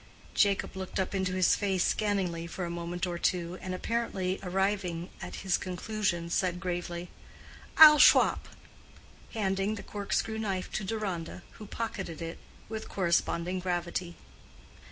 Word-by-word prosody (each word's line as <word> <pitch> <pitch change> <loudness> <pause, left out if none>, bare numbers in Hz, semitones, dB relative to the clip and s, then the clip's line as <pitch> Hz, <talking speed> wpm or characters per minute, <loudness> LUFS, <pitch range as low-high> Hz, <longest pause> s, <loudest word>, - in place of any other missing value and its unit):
Jacob 200 -2 +2
looked 190 0 -4
up 190 - -1
into 190 -1 0
his 185 -1 +4
face 190 -3 +1
scanningly 185 -5 0
for 180 +1 -4
a 170 - -4
moment 170 +1 -3
or 175 -1 -4
two, 175 0 -1
and 185 0 -4
apparently 195 -3 -1
arriving 190 -2 -1
at - - -6
his 190 - +2
conclusions, 185 -2 -2
said 180 -2 0
gravely, 175 -1 -4 0.7
"I'll 305 -1 +11
shwop," - - +6 0.9
handing 195 0 0
the 205 - -8
cork 205 -1 -7
screw 220 0 0
knife 195 -4 -2
to 215 - -2
Deronda, 195 -5 -4 0.2
who 215 - -8
pocketed 195 -7 -4
it 165 -1 -6 0.3
with 220 0 -6
corresponding 175 0 0
gravity. 175 -1 -2
185 Hz, 140 wpm, -30 LUFS, 175-200 Hz, 0.9 s, I'll